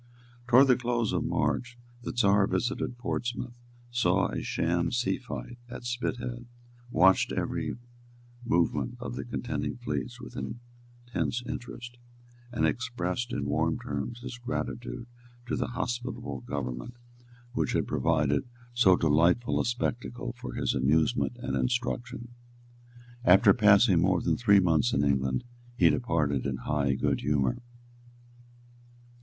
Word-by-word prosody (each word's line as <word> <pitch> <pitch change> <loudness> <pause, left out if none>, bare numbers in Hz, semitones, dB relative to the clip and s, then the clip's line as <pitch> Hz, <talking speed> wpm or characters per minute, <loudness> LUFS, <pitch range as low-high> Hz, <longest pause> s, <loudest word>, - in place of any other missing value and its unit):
Towards 130 +3 +7
the 125 - +6
close 120 -2 -1
of - - 0
March 125 0 -1 0.2
the - - -4
Czar 100 -4 +3
visited 120 0 -1
Portsmouth, 120 0 -3 0.4
saw 120 -1 +2
a - - -3
sham 85 +1 0
seafight 125 0 -3
at 120 - -8
Spithead, 120 0 -3 0.4
watched 95 -3 +4
every - - -2 0.7
movement 115 +4 0
of 120 - -5
the - - -4
contending 120 +1 -3
fleets 120 0 -4
with - - -10
intense 120 0 -5
interest, 120 0 -7 0.5
and 105 -10 +1
expressed 120 +2 -2
in 70 - -2
warm 70 - +1
terms 70 - -5
his 125 0 -7
gratitude 120 -1 -4 0.4
to 120 - -2
the - - -1
hospitable 120 - -4
government 70 - -5 0.6
which - - 0
had - - +1
provided 75 -1 +1 0.3
so 110 -7 +6
delightful 85 +8 +3
a - - +1
spectacle 120 0 -2
for 125 +1 -7
his - - 0
amusement 80 - +2
and 120 - -3
instruction. 125 -1 -2 0.9
After 100 -1 +7
passing 100 -2 +5
more 90 0 +3
than - - +1
three 105 -4 +5
months 80 -9 +2
in 70 - +2
England, 65 -2 +1 0.3
he - - +6
departed 75 - 0
in - - -2
high 70 -3 0
good - - 0
humour. 70 -3 +1
120 Hz, 125 wpm, -29 LUFS, 85-120 Hz, 0.9 s, Towards